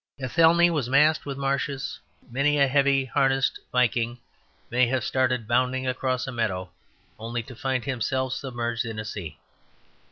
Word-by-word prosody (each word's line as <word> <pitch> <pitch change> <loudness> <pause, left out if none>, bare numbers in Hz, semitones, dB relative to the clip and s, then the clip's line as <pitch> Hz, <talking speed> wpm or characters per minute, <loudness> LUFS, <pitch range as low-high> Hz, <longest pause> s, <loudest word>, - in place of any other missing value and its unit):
Athelney 165 +6 +4
was 145 -7 -1
masked 150 +3 +3
with 140 -1 -4
marshes; 140 0 -2 0.3
many 145 +4 +2
a 140 -1 +4
heavy 140 0 +3
harnessed 135 +1 +1
Viking 120 -1 +1 0.5
may 125 +1 +3
have 130 -1 0
started 125 -2 0
bounding 130 +2 +1
across 130 0 -1
a 135 - -5
meadow 95 -7 -2 0.5
only 115 +1 -4
to 125 +2 -11
find 130 0 -2
himself 130 0 -1
submerged 120 -3 -3
in 115 -2 -6
a 110 - -4
sea. 85 -8 -6
130 Hz, 150 wpm, -25 LUFS, 120-140 Hz, 0.5 s, Athelney